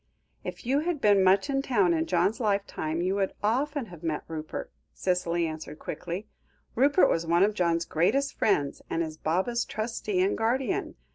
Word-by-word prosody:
"If -, -, -7 dB
you 270 Hz, +4 st, +2 dB
had 330 Hz, 0 st, -1 dB
been 205 Hz, -5 st, +4 dB
much 190 Hz, +5 st, +4 dB
in 270 Hz, -1 st, 0 dB
town 205 Hz, -10 st, +2 dB
in 160 Hz, 0 st, 0 dB
John's 185 Hz, +5 st, +1 dB
lifetime 200 Hz, -7 st, -1 dB
you 185 Hz, +1 st, +1 dB
would 195 Hz, -1 st, 0 dB
often 275 Hz, +5 st, 0 dB
have 165 Hz, -, -11 dB
met 160 Hz, -3 st, -2 dB
Rupert," 155 Hz, -1 st, -6 dB, 0.2 s
Cicely 175 Hz, -2 st, 0 dB
answered 155 Hz, -1 st, -6 dB
quickly. 180 Hz, +6 st, -5 dB, 0.5 s
"Rupert 280 Hz, +8 st, +4 dB
was 165 Hz, 0 st, 0 dB
one 170 Hz, +2 st, +4 dB
of 210 Hz, +1 st, +3 dB
John's 170 Hz, -3 st, +1 dB
greatest 270 Hz, -, +1 dB
friends, 145 Hz, -10 st, +1 dB
and 165 Hz, -, 0 dB
is 155 Hz, -1 st, -5 dB
Baba's 190 Hz, +11 st, 0 dB
trustee 215 Hz, -3 st, -3 dB
and 190 Hz, -, +2 dB
guardian. 235 Hz, +1 st, -1 dB
190 Hz, 170 wpm, -28 LUFS, 170-235 Hz, 0.5 s, been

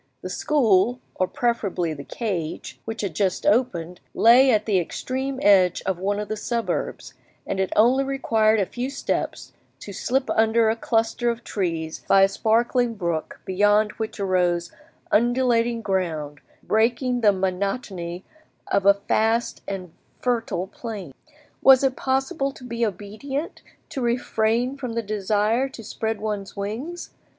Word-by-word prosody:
The 185 Hz, -, -5 dB
school, 240 Hz, -4 st, +2 dB
or 185 Hz, -, 0 dB
preferably 200 Hz, -9 st, -1 dB
the 140 Hz, -2 st, -8 dB
cage, 175 Hz, -, -4 dB
which 225 Hz, 0 st, -4 dB
had 195 Hz, -5 st, -3 dB
just 185 Hz, +2 st, -1 dB
opened, 180 Hz, -7 st, +1 dB, 0.2 s
lay 250 Hz, +4 st, +6 dB
at 215 Hz, -3 st, +3 dB
the 200 Hz, -4 st, +2 dB
extreme 265 Hz, +9 st, -3 dB
edge 185 Hz, -3 st, +4 dB
of 185 Hz, -2 st, -1 dB
one 200 Hz, +2 st, -1 dB
of 210 Hz, -, -4 dB
the 215 Hz, -, -3 dB
suburbs, 225 Hz, -3 st, -3 dB, 0.3 s
and 195 Hz, -, -3 dB
it 190 Hz, -1 st, 0 dB
only 250 Hz, +5 st, +4 dB
required 225 Hz, -5 st, +2 dB
a 195 Hz, -, +2 dB
few 245 Hz, +7 st, -4 dB
steps 275 Hz, -, -3 dB, 0.3 s
to 200 Hz, -, -8 dB
slip 260 Hz, +7 st, -1 dB
under 220 Hz, 0 st, +3 dB
a -, -, -1 dB
cluster 225 Hz, +1 st, 0 dB
of 235 Hz, 0 st, -3 dB
trees 165 Hz, -5 st, -3 dB
by 195 Hz, 0 st, +6 dB
a -, -, +7 dB
sparkling 230 Hz, +3 st, +1 dB
brook 170 Hz, -5 st, -3 dB
beyond 205 Hz, +2 st, +3 dB
which 220 Hz, -1 st, -4 dB
rose 180 Hz, -3 st, +1 dB, 0.4 s
undulating 240 Hz, 0 st, +2 dB
ground, 160 Hz, -7 st, -2 dB, 0.2 s
breaking 240 Hz, +3 st, +1 dB
the 210 Hz, -2 st, +6 dB
monotony 190 Hz, -1 st, -3 dB, 0.5 s
of 200 Hz, 0 st, +2 dB
a 200 Hz, 0 st, +6 dB
vast 225 Hz, +2 st, +1 dB
and 185 Hz, -4 st, -5 dB, 0.3 s
fertile 230 Hz, -7 st, -1 dB
plain. 200 Hz, -, -7 dB, 0.5 s
Was 265 Hz, 0 st, +7 dB
it 265 Hz, -1 st, +2 dB
possible 270 Hz, +1 st, -1 dB
to 255 Hz, -, -14 dB
be 235 Hz, -1 st, -3 dB
obedient, 220 Hz, -, -4 dB, 0.3 s
to 270 Hz, -, -4 dB
refrain 240 Hz, +1 st, 0 dB
from 250 Hz, -4 st, -5 dB
the 230 Hz, 0 st, -2 dB
desire 215 Hz, +5 st, 0 dB
to 235 Hz, -4 st, -10 dB
spread 220 Hz, 0 st, -3 dB
one's 210 Hz, -2 st, -4 dB
wings? 240 Hz, +13 st, -5 dB
220 Hz, 145 wpm, -24 LUFS, 190-240 Hz, 0.5 s, a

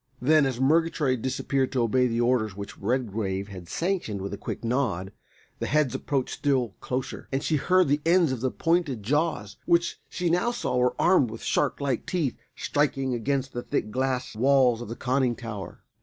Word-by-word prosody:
_] -, -, -53 dB, 0.2 s
Then, 150 Hz, +2 st, +4 dB
as 125 Hz, -2 st, -3 dB
Murgatroyd 145 Hz, -3 st, +2 dB
disappeared 130 Hz, +1 st, -1 dB
to 125 Hz, -3 st, +2 dB
obey 125 Hz, +2 st, +3 dB
the 115 Hz, 0 st, 0 dB
orders 120 Hz, -5 st, +1 dB
which 100 Hz, 0 st, -7 dB
Redgrave 100 Hz, -4 st, -1 dB
had 90 Hz, -4 st, -9 dB
sanctioned 170 Hz, -, -1 dB
with 100 Hz, +1 st, -5 dB
a -, -, -4 dB
quick -, -, -6 dB
nod, 115 Hz, -7 st, -1 dB, 0.5 s
the -, -, -2 dB
heads 150 Hz, -4 st, +2 dB
approached 135 Hz, -3 st, -1 dB
still 135 Hz, -5 st, +1 dB
closer, 130 Hz, +1 st, -4 dB
and 135 Hz, +2 st, -1 dB
she 155 Hz, -, +1 dB
heard 185 Hz, +4 st, +3 dB
the 145 Hz, +2 st, +1 dB
ends 170 Hz, -2 st, +4 dB
of 130 Hz, -3 st, -3 dB
the 130 Hz, -, +1 dB
pointed 165 Hz, -, 0 dB
jaws, 145 Hz, -5 st, -1 dB
which 170 Hz, 0 st, +2 dB
she 175 Hz, -2 st, -1 dB
now 180 Hz, +7 st, +2 dB
saw 185 Hz, -, -2 dB
were 125 Hz, 0 st, +2 dB
armed 175 Hz, -9 st, +4 dB
with 115 Hz, +1 st, -8 dB
shark 145 Hz, -, 0 dB
like 140 Hz, -4 st, -1 dB
teeth, 160 Hz, -9 st, 0 dB, 0.2 s
striking 135 Hz, -3 st, 0 dB
against 135 Hz, +3 st, -1 dB
the 120 Hz, -, -3 dB
thick 105 Hz, -, -2 dB
glass 130 Hz, -1 st, -1 dB
walls 125 Hz, -1 st, +4 dB
of 120 Hz, -, -7 dB
the 115 Hz, -, -4 dB
conning 130 Hz, -1 st, +1 dB
tower. 105 Hz, -7 st, -7 dB
130 Hz, 190 wpm, -26 LUFS, 115-145 Hz, 0.5 s, Then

